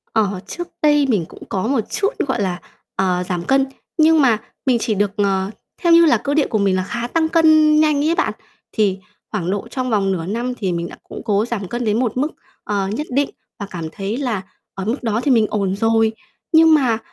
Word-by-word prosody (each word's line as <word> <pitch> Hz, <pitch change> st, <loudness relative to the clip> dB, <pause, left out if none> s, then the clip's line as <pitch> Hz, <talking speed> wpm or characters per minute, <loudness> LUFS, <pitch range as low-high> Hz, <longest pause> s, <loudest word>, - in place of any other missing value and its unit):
Ờ, 205 Hz, -4 st, +1 dB
trước 350 Hz, +8 st, -5 dB
đây 295 Hz, -1 st, +4 dB
mình 200 Hz, -9 st, +1 dB
cũng -, -, -13 dB
có 190 Hz, +2 st, -1 dB
một 275 Hz, 0 st, +1 dB
chút, 400 Hz, -, 0 dB, 0.2 s
gọi 250 Hz, -4 st, -1 dB
là, 185 Hz, -2 st, -1 dB, 0.4 s
ờ, 180 Hz, -1 st, +1 dB
giảm 175 Hz, -2 st, -2 dB
cân, 270 Hz, +7 st, +3 dB, 0.3 s
nhưng 320 Hz, 0 st, +5 dB
mà 240 Hz, -5 st, +4 dB, 0.3 s
mình 255 Hz, -3 st, +3 dB
chỉ 225 Hz, -1 st, -1 dB
được, 205 Hz, 0 st, +1 dB
ờ, 195 Hz, -1 st, 0 dB, 0.3 s
theo 345 Hz, -3 st, +4 dB
như 335 Hz, 0 st, +7 dB
là 270 Hz, -7 st, +4 dB
cơ 280 Hz, +6 st, -2 dB
địa 300 Hz, -1 st, +2 dB
của 220 Hz, -, -1 dB
mình 200 Hz, -2 st, +2 dB
là 185 Hz, -, 0 dB
khá 235 Hz, +5 st, -4 dB
tăng 320 Hz, +4 st, 0 dB
cân 315 Hz, -2 st, +5 dB
nhanh 305 Hz, -2 st, +3 dB
ấy 335 Hz, -, +2 dB
bạn, -, -, 0 dB, 0.4 s
thì 200 Hz, -3 st, +1 dB, 0.3 s
khoảng 185 Hz, -5 st, -2 dB
độ 200 Hz, 0 st, -3 dB
trong 255 Hz, -1 st, -3 dB
vòng 200 Hz, -4 st, +1 dB
nửa 170 Hz, -3 st, -2 dB
năm 235 Hz, +6 st, -2 dB
thì 190 Hz, -5 st, -1 dB
mình 170 Hz, 0 st, -2 dB
đã, -, -, -10 dB
cũng -, -, -9 dB
cố 210 Hz, -1 st, +2 dB
giảm 225 Hz, -5 st, -4 dB
cân 240 Hz, +5 st, -3 dB
đến 215 Hz, +1 st, +1 dB
một 250 Hz, -1 st, -1 dB
mức, 280 Hz, +4 st, +2 dB, 0.4 s
ờ, 200 Hz, -2 st, -1 dB
nhất 235 Hz, +11 st, -3 dB
định 275 Hz, +2 st, +1 dB, 0.3 s
và 200 Hz, -, -4 dB
cảm 165 Hz, -3 st, -5 dB
thấy 200 Hz, +5 st, -4 dB
là 245 Hz, -8 st, -2 dB, 0.3 s
ở 195 Hz, -, -5 dB
mức 235 Hz, +6 st, -2 dB
đó 225 Hz, -1 st, 0 dB
thì 285 Hz, -, +2 dB
mình 225 Hz, -4 st, +4 dB
ổn 195 Hz, -2 st, -1 dB
rồi. 225 Hz, +1 st, +2 dB, 0.4 s
Nhưng 320 Hz, -1 st, +6 dB
mà, 255 Hz, -7 st, +3 dB
225 Hz, 230 wpm, -19 LUFS, 195-280 Hz, 0.4 s, như